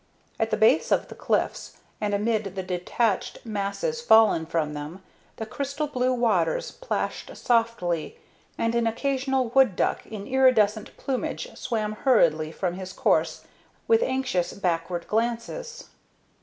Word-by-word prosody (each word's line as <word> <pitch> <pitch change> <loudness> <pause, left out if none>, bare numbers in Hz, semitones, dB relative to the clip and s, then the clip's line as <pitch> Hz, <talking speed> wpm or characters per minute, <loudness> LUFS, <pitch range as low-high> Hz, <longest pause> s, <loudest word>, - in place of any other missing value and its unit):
At - - +1
the - - 0
base - - +4
of - - +2
the - - -8
cliffs, - - -2 0.2
and 205 -1 0
amid 210 -2 -1
the 190 - -3
detached 185 +6 -1
masses 220 - -2
fallen 220 - +5
from 160 -2 -1
them, 150 +6 -7 0.3
the 220 - -5
crystal 280 +6 -3
blue 255 -3 0
waters 215 -10 +1
plashed - - -4
softly, 225 -9 0 0.4
and 230 0 0
an 235 -1 +1
occasional 265 +1 0
wood 255 -5 +4
duck - - 0
in 210 -2 -7
iridescent 240 -5 +2
plumage 260 -2 -3
swam 220 -4 -2
hurriedly 165 - +3
from 175 +1 -2
his 185 0 -7
course - - +1 0.4
with 455 0 +4
anxious 260 - 0
backward 175 -2 -2
glances. 240 - -3
220 Hz, 135 wpm, -25 LUFS, 185-255 Hz, 0.4 s, fallen